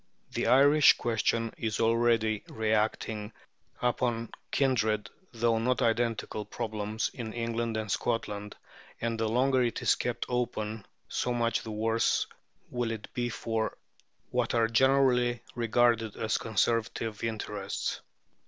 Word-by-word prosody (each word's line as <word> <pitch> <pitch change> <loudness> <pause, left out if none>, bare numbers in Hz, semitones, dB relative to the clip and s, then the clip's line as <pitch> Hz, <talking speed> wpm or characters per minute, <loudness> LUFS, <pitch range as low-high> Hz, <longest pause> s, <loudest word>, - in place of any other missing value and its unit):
The - - -1
Irish 145 +3 +7
question 115 0 0
is 110 -2 -2
already 115 -2 +2
reacting 110 0 -1 0.5
upon 120 -2 0 0.2
kindred, 110 -6 +1 0.2
though 115 -1 +1
not 125 +3 +1
identical, 115 -2 0
problems 110 -1 -3
in 110 -3 -6
England 115 -1 -2
and 110 -2 -3
Scotland, 105 -3 -2 0.4
and 115 -1 -2
the 110 -1 +1
longer 130 +3 +3
it 120 -2 0
is - - +5
kept 120 -1 -2
open, 110 -4 -2 0.2
so 125 -1 -1
much 115 -1 +1
the - - -8
worse 110 +1 +1 0.5
will 120 -2 -1
it 110 -2 -6
be 120 -1 -1
for 115 -1 -2 0.5
what 125 -1 0
are 115 -1 +4
generally 125 0 +3
regarded 115 -1 +2
as 110 -1 0
Conservative 115 0 -1
interests. 105 -3 -3
115 Hz, 125 wpm, -29 LUFS, 110-120 Hz, 0.5 s, Irish